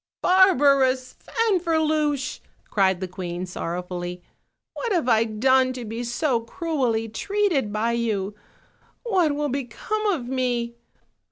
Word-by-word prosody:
"Barbarous 275 -8 +4
Fanferluche," 315 - 0 0.3
cried 190 -3 +2
the 185 - -2
queen 180 0 -5
sorrow 180 0 -4
fully, 180 0 -6 0.5
"what 475 - -3
have 340 -9 +1
I 225 -2 +4
done 255 +4 +3
to 250 -2 -6
be 225 +2 -4
so 240 +1 0
cruelly 235 -3 -1
treated 340 - 0
by 215 +2 0
you? 215 -4 -1 0.7
What 365 -11 +2
will 295 0 -1
become 275 - -3
of 320 -12 0
me? 245 -2 -1
255 Hz, 120 wpm, -24 LUFS, 220-310 Hz, 0.7 s, Barbarous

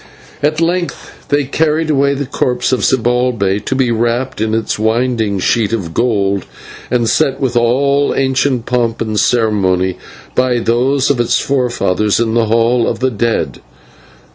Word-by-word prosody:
At 150 +2 +1
length 170 +1 -3
they 145 0 +2
carried 155 +3 0
away 140 -1 +2
the 140 +1 -3
corpse 125 -1 -1
of 130 - 0
Zibalbay 120 -5 +1
to 130 - -1
be 130 -2 +1
wrapped 120 +2 -1
in 110 0 0
its 115 -1 -2
winding 110 -2 0
sheet 110 +3 0
of 90 -8 -3
gold 100 -4 0 0.4
and 120 -2 +1
set 135 - +1
with 130 -3 -1
all 140 +4 +2
ancient 130 -2 0
pomp 120 -2 -1
and 110 -2 -1
ceremony 95 -6 +1 0.3
by 125 -1 +1
those 130 +5 +1
of 135 - -1
its 120 +1 +2
forefathers 120 -7 0
in 115 -1 0
the 115 -1 +2
Hall 115 +1 +2
of 115 - -1
the 130 +2 0
Dead. 115 +1 -2
120 Hz, 155 wpm, -15 LUFS, 110-130 Hz, 0.4 s, they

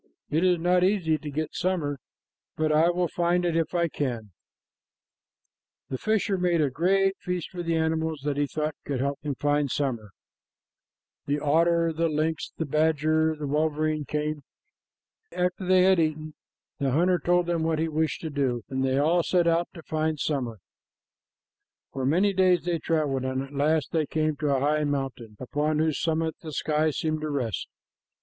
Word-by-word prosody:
"It 160 +4 +2
is 180 -1 +4
not 180 +2 +2
easy 180 -5 +2
to 150 - -6
get 155 +2 -3
summer, 165 -6 -1 0.6
but 155 0 +1
I 155 +3 +4
will 175 0 +1
find 175 +1 +1
it 170 -2 0
if 165 +1 0
I 170 -1 +2
can." 145 -3 -2
PART 110 - -12
II. 105 - -20 1.6
The 130 - -3
fisher 215 -2 +1
made 175 -2 +2
a 145 -3 +2
great 195 +6 +2
feast 180 -3 -4
for 180 - -5
the 165 -1 -1
animals 160 -1 0
that 145 -1 -1
he 145 0 0
thought 155 +1 -2
could 140 -3 -3
help 140 +2 -1
him 145 -2 -3
to - - -44
find 145 -1 +1
summer. 120 -7 -2 1.2
The 145 +1 0
otter, 165 +3 +2
the 165 +1 0
lynx, 155 +1 -1
the 160 - -1
badger, 155 +1 +2
and 155 - -12
the - - -2
wolverine 155 +1 0
came. 150 +1 -2 0.9
After 180 +1 -1
they 185 0 +5
had 190 -1 +5
eaten, 155 -1 -1 0.5
the 140 -2 +1
hunter 175 +4 +3
told 175 0 +2
them 170 -1 -1
what 160 0 +1
he 160 +1 0
wished 160 0 -1
to 160 - -4
do, 130 -5 -1
and 130 -1 -1
they 135 0 +1
all 165 +5 +3
set 175 +1 +2
out 170 +1 +2
to 165 - -10
find 155 -1 -1
summer. 125 -7 -2 1.4
For 130 -1 -2
many 190 +7 +3
days 185 -1 +3
they 175 -2 -1
traveled, 150 -5 0
and 130 0 -2
at 135 +1 -11
last 150 +1 +1
they 155 -3 0
came 155 0 0
to 150 0 -1
a 130 - 0
high 150 +2 +2
mountain 135 -6 -3
upon 150 +4 -1
whose 155 -1 0
summit 160 0 0
the 155 -2 -8
sky 155 +1 +1
seemed 155 +1 -2
to 155 - -3
rest. 125 - -2
155 Hz, 185 wpm, -26 LUFS, 145-170 Hz, 1.6 s, they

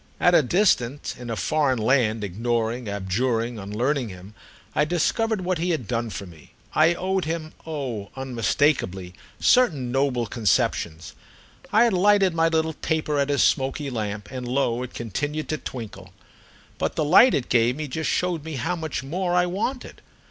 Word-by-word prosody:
At 175 - +4
a 170 - +7
distance, 145 - +1
in 125 -1 -9
a 115 - -2
foreign 145 +1 +1
land, 110 -2 +2
ignoring, 115 +3 -2
abjuring, 115 +4 -1
unlearning 120 +6 -1
him, 95 +2 -11 0.4
I - - +2
discovered 210 +6 0
what 180 -2 -1
he 175 +2 -1
had 155 - -1
done 115 -1 -1
for 100 - -6
me. 80 -5 -16 0.2
I 160 +2 +4
owed 190 0 -1
him, 160 -1 -4
oh 130 -10 -4
unmistakeably, 115 -6 0 0.3
certain 155 - +3
noble 135 -2 +1
conceptions; 85 -7 0 0.6
I 220 +3 +5
had 235 -3 +3
lighted 195 0 +4
my 165 0 +3
little 160 -1 0
taper 155 -1 -1
at 140 0 +1
his 140 -1 +3
smoky 135 +1 0
lamp, 105 -3 -4
and 125 -2 -5
lo 125 -2 0
it 125 - -7
continued 145 +7 -3
to 155 - -2
twinkle. 100 -7 -8 0.7
But - - -1
the 155 - 0
light 195 - +7
it 130 - -1
gave 120 +1 +3
me 155 +1 -4
just 160 +4 -2
showed 175 -4 0
me 160 0 -6
how 165 +7 -1
much 160 -7 -4
more 175 +5 -1
I 180 0 +4
wanted. 210 +9 -4
135 Hz, 170 wpm, -24 LUFS, 115-160 Hz, 0.7 s, a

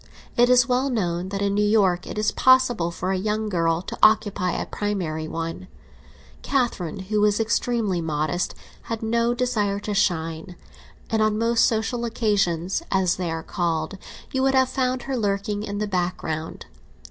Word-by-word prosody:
It 240 +1 +4
is 250 0 +5
well 255 +2 +1
known 180 -6 -1
that 200 0 -2
in 200 0 +1
New 205 +1 +2
York 195 -4 +2
it - - -6
is 215 - +1
possible 255 -9 +4
for 180 +2 -3
a 190 - 0
young 215 +2 -1
girl 165 -2 +1
to - - -6
occupy 205 -5 +3
a - - -2
primary 175 -7 -3
one. 165 +3 -5 0.7
Catherine, 220 - -1
who 210 +2 -1
was 210 0 +3
extremely 225 -4 0
modest, 155 +2 -1 0.3
had 225 -1 -3
no 235 +2 +1
desire 215 -5 0
to 210 - -3
shine, 165 -2 -1 0.6
and 220 -1 +2
on 215 0 +2
most 230 +1 +3
social 230 +2 -1
occasions, 200 - 0
as 190 -2 +2
they 180 -2 -2
are 165 0 -3
called, 170 +1 -2 0.3
you 265 - 0
would 270 0 +2
have 260 -1 +4
found 255 -1 -1
her 270 - -3
lurking 205 -2 -1
in 205 -1 -4
the 210 - -1
background. 175 -4 -3
205 Hz, 170 wpm, -24 LUFS, 175-230 Hz, 0.7 s, is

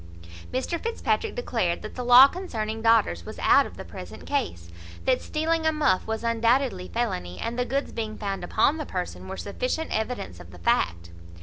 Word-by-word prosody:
Mr 290 +6 -2
Fitzpatrick 455 -1 -1
declared 225 - -1
that 215 - -7
the 250 - -4
law 245 +2 +9
concerning 225 - -4
daughters 225 - +3
was - - -9
out - - +5
of - - -13
the - - -7
present - - -10
case; 85 0 -2 0.4
that 255 -1 +2
stealing 320 +1 0
a - - +4
muff 300 -12 +1
was 220 +1 -3
undoubtedly 230 -3 +1
felony, 90 - -2
and 230 - -2
the 250 - +1
goods 275 +3 -2
being 220 -2 -4
found 195 -2 -3
upon 305 - +2
the 305 - -4
person, 180 0 -5
were 190 0 -6
sufficient 255 +10 -3
evidence 220 - -3
of 90 -1 -12
the 90 - -12
fact. 85 0 0
230 Hz, 185 wpm, -26 LUFS, 185-270 Hz, 0.4 s, law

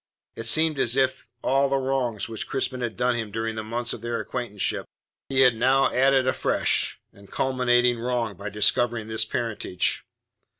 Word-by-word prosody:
It 115 - -3
seemed 155 +3 +4
as 120 0 +2
if 130 -1 +2
to - - -21 0.2
all 135 +1 +2
the 135 - +1
wrongs 130 -5 -1
which 115 -1 -6
Crispin 130 -1 -2
had 115 -5 -4
done 125 0 +1
him 115 -2 -3
during 110 +2 -3
the 110 0 -5
months 120 +2 -2
of - - -8
their 120 0 -3
acquaintanceship 120 -6 -3 0.4
he 135 -1 +3
had 125 -3 +5
now 130 +3 +2
added 135 0 +3
a 130 - +2
fresh - - 0
and 100 0 -17
culminating 125 -2 +2
wrong 120 -3 -2
by 100 +3 -6
discovering 110 +2 +1
this 110 0 +1
parentage. 110 -6 -2
120 Hz, 180 wpm, -25 LUFS, 110-130 Hz, 0.4 s, had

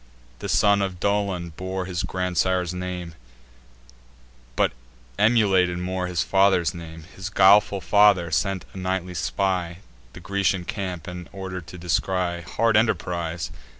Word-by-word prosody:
This - - 0
son 100 -1 +4
of 95 -2 -3
Dolon 100 -4 0
bore 95 +3 -4
his 90 -3 -3
grandsire's 90 -1 0
name, 90 -2 -5 1.4
But - - +2 0.5
emulated 100 -6 +3
more 90 0 -2
his 90 -3 0
father's 95 -4 +3
fame; 80 -2 -10
His 95 +1 -5
guileful 100 0 +5
father, 100 -5 +4
sent 95 -3 0
a - - -10
nightly 95 -1 -2
spy, 90 -2 -1 0.4
The - - -10
Grecian 95 0 0
camp 90 -5 -4
and 90 -1 -8
order 95 -1 -6
to 85 +2 -11
descry: 90 0 -1
Hard 115 +6 0
enterprise! 85 -6 -1
90 Hz, 130 wpm, -24 LUFS, 90-100 Hz, 1.4 s, guileful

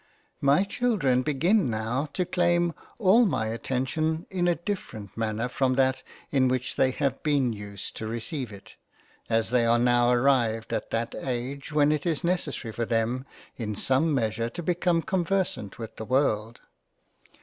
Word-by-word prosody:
MY 140 +7 +4
Children 200 - +1
begin 155 - +2
now 115 +6 -2
to 180 - 0
claim 175 -1 +2 0.2
all 220 +2 +5
my 110 - 0
attention 135 +7 -1
in 180 -2 0
a 175 - +3
different 160 - -6
Manner 115 +1 -1
from 130 +1 +1
that 130 0 +2 0.3
in 130 -2 +3
which 125 -1 -1
they 130 - +3
have 135 0 -1
been 140 -6 +1
used 100 -2 -8
to 110 - -4
receive 120 +3 -4
it, 100 -1 -13 0.5
as 115 0 +1
they 125 -1 +4
are 115 0 +4
now 120 0 +3
arrived 120 -3 +2
at - - -2
that 115 +1 -2
age 135 +3 -4
when 150 0 +4
it 150 +1 -1
is 160 -4 0
necessary 170 -9 -1
for 115 - -3
them 115 +4 -1 0.3
in 105 -3 -3
some 135 +9 +1
measure 115 -3 0
to 175 - -7
become 175 0 +1
conversant 185 - -1
with 115 -2 -8
the 110 - -5
World. 115 -3 0
130 Hz, 160 wpm, -27 LUFS, 115-160 Hz, 0.5 s, all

